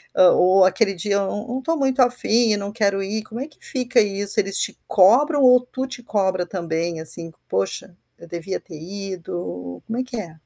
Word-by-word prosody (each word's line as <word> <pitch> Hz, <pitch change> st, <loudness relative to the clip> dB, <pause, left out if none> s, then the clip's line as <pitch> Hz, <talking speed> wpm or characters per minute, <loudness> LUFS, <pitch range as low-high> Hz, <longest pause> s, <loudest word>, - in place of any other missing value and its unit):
hã, 180 Hz, -1 st, +6 dB
ou 185 Hz, +1 st, +5 dB
aquele 195 Hz, +2 st, +2 dB
dia: 200 Hz, +3 st, -2 dB
"Eu 200 Hz, -, +2 dB
eu 195 Hz, -, -2 dB
eu 210 Hz, +4 st, -5 dB
não 250 Hz, +2 st, -3 dB
estou 325 Hz, +5 st, -1 dB
muito 270 Hz, -2 st, 0 dB
afim 240 Hz, -2 st, +2 dB
e 210 Hz, -, +2 dB
não 200 Hz, 0 st, -5 dB
quero 200 Hz, -3 st, 0 dB
ir.", 210 Hz, +3 st, -3 dB
como 225 Hz, +2 st, -8 dB
é 275 Hz, -, -4 dB
que 310 Hz, -, -20 dB
fica 250 Hz, -2 st, +1 dB
isso? 200 Hz, -1 st, +3 dB
Eles 195 Hz, 0 st, 0 dB
te -, -, -2 dB
cobram 270 Hz, -, +4 dB
ou 250 Hz, -1 st, +7 dB
tu 260 Hz, +1 st, -5 dB
te 260 Hz, -2 st, -9 dB
cobra 190 Hz, -5 st, 0 dB
também, 170 Hz, -2 st, -3 dB
assim: 165 Hz, +1 st, -3 dB, 0.2 s
"Poxa, 95 Hz, -, -3 dB, 0.2 s
eu 170 Hz, -, -13 dB
devia 170 Hz, +3 st, -5 dB
ter 160 Hz, -, -12 dB
ido.", 175 Hz, -, -7 dB
como 225 Hz, -, -4 dB
é -, -, 0 dB
que 250 Hz, -2 st, -7 dB
é? 170 Hz, -6 st, -8 dB
200 Hz, 220 wpm, -21 LUFS, 180-245 Hz, 0.2 s, ou